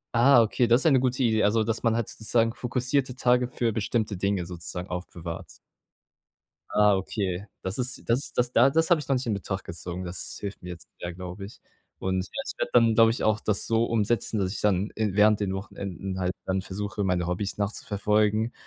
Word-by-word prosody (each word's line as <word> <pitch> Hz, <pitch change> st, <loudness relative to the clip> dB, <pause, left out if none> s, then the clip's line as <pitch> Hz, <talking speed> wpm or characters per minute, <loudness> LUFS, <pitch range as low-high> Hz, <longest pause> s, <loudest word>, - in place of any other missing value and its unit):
Ah, 120 Hz, +1 st, +6 dB
okay, 115 Hz, +2 st, +2 dB
das 120 Hz, +3 st, +4 dB
ist -, -, -1 dB
eine 135 Hz, -4 st, +5 dB
gute 130 Hz, +1 st, 0 dB
Idee. 110 Hz, -3 st, +2 dB
Also, 110 Hz, +2 st, +3 dB
dass 115 Hz, +1 st, -2 dB
man 115 Hz, -1 st, +2 dB
halt 115 Hz, -2 st, -1 dB
sozusagen 115 Hz, +1 st, +1 dB
fokussierte 125 Hz, +1 st, -1 dB
Tage 125 Hz, -1 st, +2 dB
für 120 Hz, -2 st, -1 dB
bestimmte 105 Hz, -1 st, -1 dB
Dinge 100 Hz, -1 st, 0 dB
sozusagen 90 Hz, +1 st, -6 dB
aufbewahrt. 85 Hz, -2 st, -7 dB, 1.1 s
Ah, 105 Hz, -1 st, +4 dB
okay. 95 Hz, 0 st, -3 dB, 0.2 s
Das 95 Hz, +2 st, -1 dB
ist 125 Hz, 0 st, -1 dB
das 120 Hz, +4 st, +1 dB, 0.2 s
da 125 Hz, +2 st, +5 dB
das 160 Hz, +4 st, +2 dB
habe 170 Hz, -, +6 dB
ich -, -, -9 dB
noch 135 Hz, -, +2 dB
nicht 130 Hz, +1 st, -2 dB
in 115 Hz, -, 0 dB
Betracht 95 Hz, -1 st, -4 dB
gezogen. 90 Hz, +2 st, -6 dB
Das 90 Hz, 0 st, -4 dB
hilft 100 Hz, -1 st, -6 dB
mir 90 Hz, -, -8 dB
jetzt 85 Hz, -2 st, -9 dB
sehr, 85 Hz, 0 st, -4 dB
glaube 90 Hz, +2 st, -7 dB
ich. 105 Hz, -, -13 dB, 0.4 s
Und 95 Hz, 0 st, -1 dB
ja, -, -, -5 dB
ich -, -, -5 dB
werde -, -, -1 dB
dann, 115 Hz, -2 st, +5 dB
glaube 115 Hz, 0 st, +6 dB
ich 115 Hz, -, -3 dB
auch, 110 Hz, -1 st, +2 dB
das 105 Hz, -2 st, +1 dB
so 115 Hz, 0 st, +2 dB
umsetzen, 115 Hz, 0 st, 0 dB
dass 95 Hz, -2 st, 0 dB
ich -, -, -5 dB
dann 100 Hz, 0 st, +1 dB
in 105 Hz, -3 st, -1 dB
während 105 Hz, 0 st, +5 dB
den 100 Hz, -2 st, -1 dB
Wochenenden 95 Hz, -1 st, -5 dB
halt 90 Hz, -1 st, 0 dB
dann 95 Hz, 0 st, 0 dB
versuche, 100 Hz, +2 st, -4 dB
meine 90 Hz, -2 st, 0 dB
Hobbys 95 Hz, +3 st, -2 dB
nachzuverfolgen 105 Hz, +2 st, 0 dB
105 Hz, 205 wpm, -26 LUFS, 95-115 Hz, 1.1 s, Ah